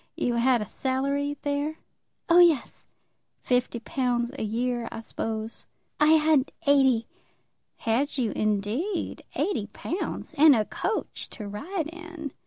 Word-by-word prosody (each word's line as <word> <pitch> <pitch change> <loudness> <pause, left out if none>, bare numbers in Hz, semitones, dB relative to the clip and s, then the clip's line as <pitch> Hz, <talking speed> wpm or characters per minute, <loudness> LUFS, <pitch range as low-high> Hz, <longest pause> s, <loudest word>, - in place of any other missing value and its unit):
You 245 - 0
had 240 -1 +3
a - - -9
salary 280 +4 -1
there?" 290 +2 -1 0.5
"Oh 340 +1 +6
yes." 335 -7 +3 0.6
"Fifty 250 -1 +1
pounds 245 0 -1
a - - -3
year, 235 +2 -1
I 225 - -6
suppose." 220 0 -5 0.3
"I 300 +1 +6
had 305 -3 +3
eighty." 265 -5 +4 0.7
"Had 255 +7 0
you, 235 -5 0
indeed; 215 - -1
eighty 350 - -1
pounds; 330 - -4
and 300 -2 +8
a 215 -2 +1
coach 425 - -3
to 210 - -7
ride 310 - -3
in!" 335 -4 -7
260 Hz, 130 wpm, -27 LUFS, 230-305 Hz, 0.7 s, and